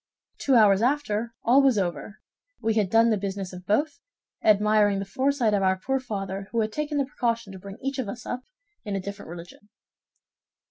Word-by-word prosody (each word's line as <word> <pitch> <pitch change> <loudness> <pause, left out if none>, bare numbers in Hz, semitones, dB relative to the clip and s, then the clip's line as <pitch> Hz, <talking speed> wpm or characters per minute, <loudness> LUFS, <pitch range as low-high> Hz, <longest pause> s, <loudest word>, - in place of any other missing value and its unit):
Two 270 - +2
hours 205 -3 +6
after, 235 -4 0
all 255 +4 +5
was 270 -5 +3
over; 195 +2 -3 0.4
we 225 -1 0
had 210 -4 +1
done 225 +2 +4
the 215 - +1
business 195 -1 -4
of 180 0 -10
both, 290 +9 +1 0.4
admiring 210 -1 +4
the 195 - -3
foresight 260 +2 +1
of 200 - +2
our 190 0 +2
poor 265 +8 -1
father, 195 -5 -5
who 230 - 0
had 215 0 -1
taken 300 +3 -2
the 280 - +2
precaution 230 -6 -2
to 190 - -9
bring 195 +2 -10
each 270 0 -2
of 235 -6 -2
us 240 +4 -7
up 250 - -4 0.4
in 205 -2 -3
a - - -1
different 200 -1 -8
religion." 175 +4 -11
215 Hz, 195 wpm, -26 LUFS, 195-245 Hz, 0.4 s, hours